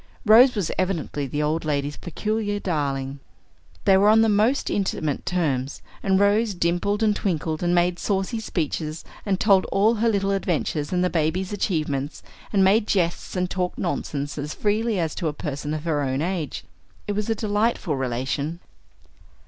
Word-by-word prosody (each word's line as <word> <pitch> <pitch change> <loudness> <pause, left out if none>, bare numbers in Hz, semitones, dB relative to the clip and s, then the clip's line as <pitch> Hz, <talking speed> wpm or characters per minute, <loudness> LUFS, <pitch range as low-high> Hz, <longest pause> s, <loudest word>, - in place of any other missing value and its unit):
Rose 240 +4 +7
was 195 -6 -1
evidently 165 -6 -1
the 145 +3 -2
old 155 +2 0
lady's 145 -1 -1
peculiar 205 +3 -2
darling. 140 -6 -2 0.7
They 190 - +6
were 205 +2 +5
on 220 +1 +6
the 225 - +4
most 215 +7 +2
intimate 160 -7 -1
terms; 145 -7 -1 0.2
and 190 -1 +2
Rose 205 +1 +3
dimpled 175 +5 0
and 210 -1 +3
twinkled, 160 -5 -2
and 175 0 +2
made 175 0 +2
saucy 200 +3 -1
speeches, 160 -5 -3 0.2
and 190 -2 +1
told 195 -3 +4
all 210 +4 +3
her 230 - +4
little 200 -2 +1
adventures 170 -6 -1
and 180 0 +1
the 180 - +1
baby's 175 +4 0
achievements, 150 -7 -2 0.3
and 195 -2 +3
made 205 +3 +4
jests, 175 -2 0
and 180 0 0
talked 180 0 -2
nonsense 145 -4 -3
as 150 +2 -4
freely 215 0 0
as 160 -3 -1
to 170 - -2
a 150 - -1
person 145 0 -4
of 155 -1 -3
her 155 -3 0
own 135 +1 -1
age. 170 -6 -3 0.4
It - - -1
was 210 +1 -2
a 225 - +2
delightful 210 -6 0
relation. 135 +5 -2
180 Hz, 170 wpm, -24 LUFS, 150-205 Hz, 0.7 s, Rose